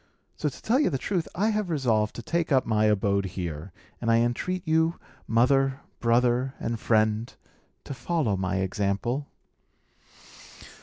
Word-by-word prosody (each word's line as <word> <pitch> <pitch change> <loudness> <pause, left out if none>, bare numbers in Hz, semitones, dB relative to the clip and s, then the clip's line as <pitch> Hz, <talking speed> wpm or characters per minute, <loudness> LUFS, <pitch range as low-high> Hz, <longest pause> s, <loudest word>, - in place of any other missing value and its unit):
So, 150 - -1
to - - -13
tell 245 +5 +2
you 295 - +3
the 140 - -1
truth, 170 +5 -2
I 210 +5 +2
have 210 -3 -1
resolved 115 -9 +1
to 120 - -7
take 170 +5 -1
up 130 -2 +4
my 110 -1 +2
abode 100 -1 +2
here; 85 0 -4 0.3
and 115 - -1
I 115 - +5
entreat 160 +10 -1
you, 160 +1 +2 0.3
mother, 135 +3 +2 0.2
brother, 120 +2 +2
and 115 -1 -3
friend, 110 +1 +1 0.5
to - - -6
follow 140 - 0
my 95 0 -1
example." 100 +8 -1
120 Hz, 150 wpm, -26 LUFS, 105-155 Hz, 0.5 s, I